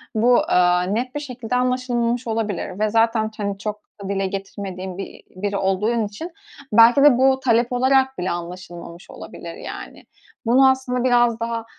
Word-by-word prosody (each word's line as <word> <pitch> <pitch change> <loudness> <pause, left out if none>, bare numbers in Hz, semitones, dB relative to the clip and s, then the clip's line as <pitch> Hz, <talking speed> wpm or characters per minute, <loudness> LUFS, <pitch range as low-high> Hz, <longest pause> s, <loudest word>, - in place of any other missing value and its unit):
bu, 240 +3 +4
aaa, 180 0 +3
net 235 +8 -2
bir - - -1
şekilde 250 -4 -5
anlaşılmamış 250 -1 0
olabilir. 210 -4 -3
Ve 215 0 +1
zaten, 225 0 +1
hani, 200 -1 -3
çok 210 +1 -5 0.2
da 195 - -6
dile 195 -1 -1
getirmediğin 190 -1 -6
bi 195 - -8
biri 200 +2 -2
olduğun 210 +4 0
için 315 - -8 0.4
belki 235 +5 +6
de 290 -4 +6
bu 265 +1 +3
talep 240 -2 +1
olarak 265 +1 +2
bile 180 +1 -2
anlaşılmamış 175 0 -8
olabilir, - - -9
yani. - - -9 0.4
Bunu 260 +3 +5
aslında 260 -2 -1
biraz 240 -2 +3
daha, 230 0 -3
225 Hz, 160 wpm, -21 LUFS, 195-250 Hz, 0.4 s, belki